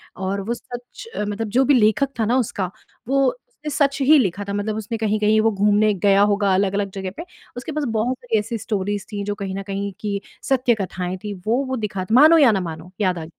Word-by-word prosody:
और 190 +2 -2
वो - - +2
सच 245 - -10
मतलब 210 +2 -2
जो 265 - +6
भी 285 - +4
लेखक 220 +5 +3
था 220 - +2
ना 240 +4 +2
उसका 205 -7 -1 0.4
वो 275 +1 +2
उसने 485 -11 -10
सच 280 -1 +1
ही 295 +3 +6
लिखा 200 -4 0
था - - -2
मतलब 205 +1 -2
उसने 220 +1 -4
कहीं-कहीं 215 0 +2
वो 225 0 +3
घूमने 210 +1 +3
गया 200 +1 +3
होगा 200 -1 +2
अलग-अलग 200 +1 0
जगह 190 -1 -4
पे, 335 - -5 0.3
उसके 255 +5 -5
पास 300 0 -2 0.2
बहुत 250 +3 0
सारी 230 -3 0
ऐसी 225 +3 -3
स्टोरीज़ 205 -2 -2
थी, 205 -1 -3
जो 205 0 -3
कहीं 195 -2 -5
न 195 - -4
कहीं 200 +1 -3
कि 205 -2 -2 0.3
सत्य 255 -3 +3
कथाएँ 185 0 -4
थी, 210 -1 -4
वो 220 +8 -1
वो 260 - -1
दिखाता 210 -2 -2
मानो 310 +5 +8
या 280 -7 +6
ना 200 - +1
मानो, 165 0 -7
याद 185 -3 +1
आ 160 - -6
210 Hz, 225 wpm, -21 LUFS, 195-245 Hz, 0.4 s, मानो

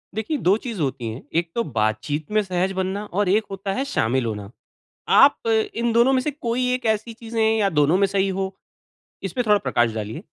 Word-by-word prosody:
देखिए, 220 +8 -2
2 190 -4 +3
चीज़ 230 -6 -5
होती 130 -4 -2
हैं, 115 +5 -7
एक 170 0 0
तो 235 - +1
बातचीत 120 - -2
में 215 - +3
सहज 185 0 -1
बनना 190 +2 -2
और 205 -1 -1
एक 210 +3 +3
होता 195 0 -3
है 265 - -1
शामिल 130 - 0
होना। 105 -3 -4 0.7
आप 465 - +5
इन 420 - +1
दोनों 235 +3 +4
में 260 - +3
से 300 - -2
कोई 250 -2 -2
एक 250 -1 -3
ऐसी 220 +2 -6
चीज़ें 225 0 -4 0.2
या 205 -2 +2
दोनों 150 +1 +3
में 200 0 +3
सही 195 0 0
हो, 190 0 -3 0.7
इसमें 195 +6 -2
थोड़ा 210 -1 +5
प्रकाश 120 - +1
डालिए। 110 - -5
195 Hz, 205 wpm, -23 LUFS, 145-230 Hz, 0.7 s, आप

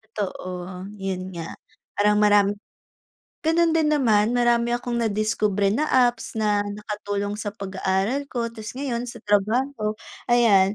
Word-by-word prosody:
Totoo, 185 -2 -5
'yun 190 -2 -4
nga. 165 -1 -7 0.4
Parang 210 0 +3
maram 205 -1 +5 1.0
gano'n 335 +1 +4
din 320 -1 +2
naman, 225 -5 +3
marami 240 -1 +2
akong 240 0 -2
nadiskubre 210 -2 +1
na 290 +9 +1
apps 250 -4 +2
na 210 -2 +1
nakatulong 205 0 -4
sa 205 -1 -4
pag-aaral 195 +7 -1
ko, 235 -4 -3
'tapos 220 -1 -8
ngayon 250 -3 -3
sa 240 - -9
trabaho 215 +2 +1 0.3
ayan. 215 -5 +4
210 Hz, 130 wpm, -24 LUFS, 200-240 Hz, 1.0 s, maram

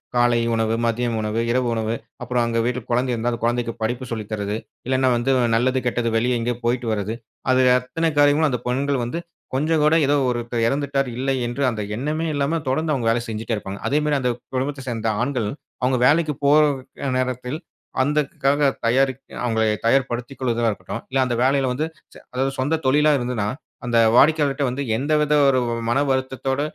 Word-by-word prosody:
காலை 120 -1 +3
உணவு, 115 0 +1
மதிய 120 +1 0
உணவு, 110 +1 -1
இரவு 125 0 +1
உணவு 110 0 -1 0.3
அப்புறம் 125 0 0
அங்க 115 0 0
வீட்ல 125 0 -2
குழந்தை 125 +1 +1
இருந்தா, 120 +1 -1
அந்த 115 - -5
குழந்தைக்கு 120 -1 0
படிப்பு 120 +3 -2
சொல்லி 110 -2 -3
தர்றது. 105 -1 -2 0.3
இல்லைனா 130 0 +2
வந்து 130 +3 +1 0.2
நல்லது, 130 +3 +2
கெட்டது, 120 -1 0
வெளிய 120 +1 +1
எங்கயோ 120 +1 -1
போயிட்டு 120 0 0
வர்றது, 105 +1 -2 0.4
அது 130 0 +4 0.2
அத்தனை 165 +6 -1
காரியமும் 145 +1 +4
அந்த 125 -2 -1
பெண்கள் 135 +1 0
வந்து 125 +8 -3 0.4
கொஞ்சம் 155 +3 +1
கூட, 150 +1 +4
"ஏதோ 145 +1 +3
ஒருத்தர் 120 -1 -1
இறந்துட்டார், 140 +1 0
இல்லை." 135 +1 0
என்று 120 +4 -4
அந்த 110 -2 -4
எண்ணமே 150 +7 -2
இல்லாம 145 +3 0
தொடர்ந்து 155 +4 0
அவுங்க 125 -5 -1
வேலை 120 - +1
செஞ்சுட்டே 110 +1 -3
இருப்பாங்க. 100 -1 -6
அதே 145 +2 +2
மாரி, 150 -1 +2
அந்த 125 -1 +1 0.2
குடும்பத்தை 135 +1 -2
சேர்ந்த 115 -2 -1
ஆண்கள், 125 -5 -1 0.3
அவுங்க 125 0 +2
வேலைக்கு 155 0 +3
போற 150 +1 +6 0.5
நேரத்தில் 130 +3 -2 0.4
அதற்காக 145 0 +1 0.2
தயாரிக் 130 +2 +2 0.2
அவுங்களை 110 -2 +1 0.2
தயார்படுத்திக் 125 +1 0
கொள்ளுதலா 120 -3 +1
இருக்கட்டும். 115 +2 -6
இல்ல, 135 - 0
அந்த 120 -2 -1
வேலைல 135 0 +2
வந்து 150 +5 -1 0.3
ச - - -20 0.2
அதாவது 135 +2 0
சொந்த 145 +5 +1
தொழில 150 +3 +4
இருந்ததுன்னா, 120 -5 -2 0.4
அந்த 120 -1 +1 0.2
வாடிக்கையாளர்ட்ட 145 0 +4
வந்து, 130 +3 -3 0.2
எந்த 145 +4 -1
வித 150 0 +1
ஒரு 130 -2 +4 0.3
மன 120 +4 +2
வருத்தத்தோட, 130 +1 -1
125 Hz, 175 wpm, -22 LUFS, 120-140 Hz, 0.5 s, போற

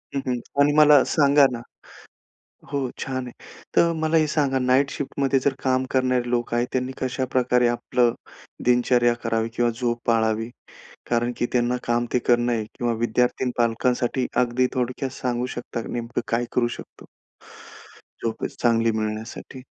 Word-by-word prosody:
हं, - - +1
हं. 125 -1 0 0.2
आणि 145 - +4
मला 150 -2 +7
सांगा 140 -1 +4
ना 120 - -4 1.1
हो 140 - -1 0.2
छान 130 -1 -3
आहे. 125 - -9 0.4
तर 170 0 +4
मला 160 +1 +1
हे 155 -1 +4
सांगा 140 -3 +1
नाईट 130 +2 +2
शिफ्ट 140 - -6
मध्ये 135 0 +3
जर 135 +1 +1
काम 130 0 +1
करणारे 130 -2 +1
लोक 120 -1 -1
आहेत 120 +1 +1
त्यांनी 130 0 -1
कशाप्रकारे 130 -1 +1
आपलं 120 0 +1 0.5
दिनचर्या 120 0 +3
करावी 115 0 0
किंवा 120 0 +2
झोप 120 0 -2
पाळावी? 115 0 +1 0.6
कारण 120 0 +1
की 120 - 0
त्यांना 125 0 +1
काम 120 0 +1
ते - - +3
करणं 120 0 +2
आहे 110 -2 -1
किंवा 120 -1 0
विद्यार्थी 125 +3 +1
आणि 125 - -1
पालकांसाठी 120 +2 +1 0.2
अगदी 125 +1 +1
थोडक्यात 125 +1 -2
सांगू 125 0 -1
शकता 120 -1 -5
नेमकं 120 0 -3
काय 115 +1 0
करू 120 -1 +2
शकतो, - - -10 1.2
झोप 115 -1 -3
चांगली 115 -1 +2
मिळण्यासाठी? 110 +4 -5
125 Hz, 155 wpm, -23 LUFS, 120-130 Hz, 1.2 s, मला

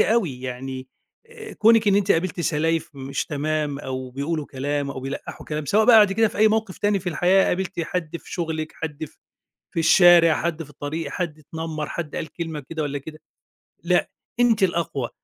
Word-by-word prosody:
أوي. 180 - +1
يعني، 130 +1 -6 0.4
آآ، 450 -2 -11
كونك 225 0 +4
إن 200 - +4
أنتِ 200 0 +3
قابلتِ 175 +1 -1
سلايف 165 +1 0
مش 135 0 -3
تمام 150 -1 -2
أو 130 -2 -5
بيقولوا 145 +3 -3
كلام 140 +1 -2
أو 130 - -6
بيلقّحوا 135 +2 -7
كلام، 150 0 -3
سواء 215 +8 +3
بقى 240 -2 +8
بعد 205 -2 +5
كده 225 +1 +3
في - - -9
أي 215 +1 +6
موقف 220 -3 -1
تاني 205 -1 +2
في 180 - -3
الحياة 180 +3 +3
قابلتِ 185 -1 -2
حد 170 0 -3
في - - -13
شغلِك، 160 -3 -3
حد 155 -1 -5
في، - - -15 0.6
في 165 - -1
الشارع، 170 -1 +7
حد 165 -1 -2
في 145 - -13
الطريق، 145 +1 -5
حد 170 -4 -3
اتنمر، 155 0 -5
حد 160 -4 -5
قال 155 - -5
كلمة 165 -3 -5
كده 160 -1 -2
والَّا 145 -1 -2
كده. 155 +3 -10 0.7
لأ، - - +2 0.3
أنتِ 230 -4 +4
الأقوى. 170 -8 0
160 Hz, 190 wpm, -23 LUFS, 145-185 Hz, 0.7 s, بقى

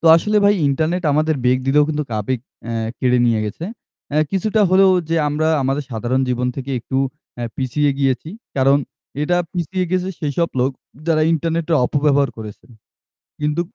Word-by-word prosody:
তো - - -1
আসলে 210 +5 0
ভাই 205 0 +5
ইন্টারনেট 160 +6 0
আমাদের 155 +2 +2
বেগ 125 +1 +4
দিলেও 145 +2 +4
কিন্তু 150 -1 -1 0.2
আবেগ 125 +5 -2 0.3
অ্যা 115 - -3 0.3
কেড়ে 125 -1 +2
নিয়ে 115 -2 +2
গেছে। 105 +10 -5 0.5
অ্যা 150 +1 +2
কিছুটা 215 +3 +1
হলেও 190 +1 +6 0.2
যে 165 - +1
আমরা 155 +2 0
আমাদের 135 +2 -1
সাধারণ 120 +3 -1
জীবন 125 0 0
থেকে 135 0 -5
একটু 130 - -4 0.4
অ্যা 120 - -4
পিছিয়ে 140 +3 +1
গিয়েছি। 135 +2 0 0.3
কারণ 135 +1 +4 0.4
এটা 175 +4 +1 0.2
পিছিয়ে 180 +1 -2
গেছে 185 0 0
সেইসব 155 +3 0
লোক 130 +2 +2 0.4
যারা 160 -2 +3
ইন্টারনেট 165 +1 0
টা - - +4
অপব্যবহার 145 -1 +2
করেছে। 105 -2 -9 0.8
কিন্তু 150 +2 0
150 Hz, 165 wpm, -19 LUFS, 130-165 Hz, 0.8 s, হলেও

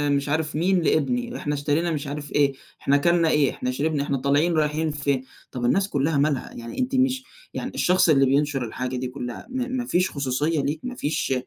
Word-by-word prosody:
مش 140 +1 -1
عارف 155 0 -1
مين 180 +3 +2
لابني، 235 - +1
ده 250 - -6
إحنا 150 - -2
اشترينا 145 +4 0
مش 150 -2 -3
عارف 145 0 -6
إيه، 140 -2 +3 0.3
إحنا 140 +1 +3
كَلْنا 170 +1 +3
إيه، 145 -3 +3
إحنا 125 - -3
شربنا، 145 +2 0
إحنا 140 -1 -1
طالعين 145 +6 +2
رايحين 155 0 +1
فين، 140 -2 -1 0.3
طَب 120 -1 -3
الناس 195 +9 +2
كلّها 145 +2 +1
مالها؟ 145 -1 0
يعني 115 - -7
أنتِ 255 +1 0
مش 260 0 +2 0.3
يعني - - -4
الشخص 180 -1 +3
اللي 135 -3 +5
بينشر 140 -1 +1
الحاجة 125 +3 -4
دي 125 0 -2
كلّها، 125 -2 -7
ما 260 0 -2
ما 255 -1 -2
فيش 180 -5 +1
خصوصية 145 +3 0
ليك 145 +3 -2
ما 250 0 -5
فيش 150 - -1
150 Hz, 210 wpm, -24 LUFS, 140-170 Hz, 0.3 s, اللي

